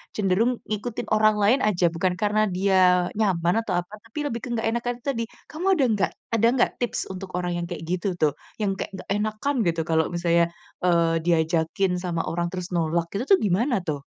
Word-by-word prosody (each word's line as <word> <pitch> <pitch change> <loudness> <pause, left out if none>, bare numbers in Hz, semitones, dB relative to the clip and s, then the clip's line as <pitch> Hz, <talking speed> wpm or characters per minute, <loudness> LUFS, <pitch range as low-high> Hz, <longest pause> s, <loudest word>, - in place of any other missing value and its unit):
cenderung 210 +4 +2 0.2
ngikutin 215 +2 -4
orang 215 0 +4
lain 245 +7 +4
aja, 180 -5 +3
bukan 180 +2 0
karena 215 0 +2
dia 185 -2 +4
nyaman 180 -3 +2
atau 205 - -5
apa, 180 +4 -8
tapi 225 +6 -15
lebih 235 -3 -3
ke - - -5
nggak 225 0 -1
enakan 235 +1 -1
itu - - -34
tadi. 230 - -1 0.2
Kamu 325 +4 -6
ada - - +4
nggak 200 -2 +1 0.2
ada 230 +1 +4
nggak 245 - +3
tips 245 - -1
untuk 190 0 -7
orang 180 0 -2
yang 175 0 -2
kayak 170 -2 -6
gitu 180 +2 -1
tuh, 150 -2 +3 0.3
yang 195 -2 0
kayak - - -4
nggak 190 - -10
enakan 215 +7 -1
gitu 165 -1 +1
kalau 160 -1 +2
misalnya, 170 0 +2 0.4
eee, 170 -2 +3
diajakin 165 +3 +1
sama 170 -2 -1
orang 170 +1 -1
terus 180 -1 -4
nolak 165 0 0
gitu 225 - 0
tuh, - - -1
gimana 225 +7 +2
tuh? 145 -2 -2
185 Hz, 200 wpm, -24 LUFS, 170-215 Hz, 0.4 s, orang